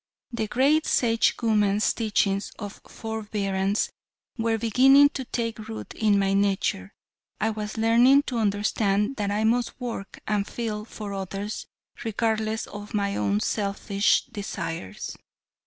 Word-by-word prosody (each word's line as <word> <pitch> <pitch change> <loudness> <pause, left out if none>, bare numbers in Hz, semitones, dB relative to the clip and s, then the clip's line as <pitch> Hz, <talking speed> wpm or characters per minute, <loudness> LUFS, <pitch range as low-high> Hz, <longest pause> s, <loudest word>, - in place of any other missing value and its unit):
The 225 -2 -2
great 275 +8 +3
Sagewoman's 220 -3 +2
teachings 205 -3 0
on 205 -2 -5
forbearance 205 -3 -2 0.4
were 225 -2 0
beginning 265 +6 +6
to 265 -2 -5
take 230 -2 -3
root 220 0 -7
in 210 -2 +2
my 195 0 +2
nature. 195 - 0 0.5
I 220 - +1
was 215 0 -5
learning 240 +5 +5
to 245 -5 -3
understand 205 +2 +1
that 205 -2 -1
I 210 +2 0
must 235 +3 +1
work 235 -6 -6
and 205 -1 0
feel 215 -3 -4
for 210 -2 -7
others, 195 +2 -5 0.4
regardless 220 -1 -1
of 205 +1 -8
my 200 -1 0
own 105 0 +1
selfish 200 0 +1
desires. 190 - -5
215 Hz, 125 wpm, -26 LUFS, 200-230 Hz, 0.5 s, beginning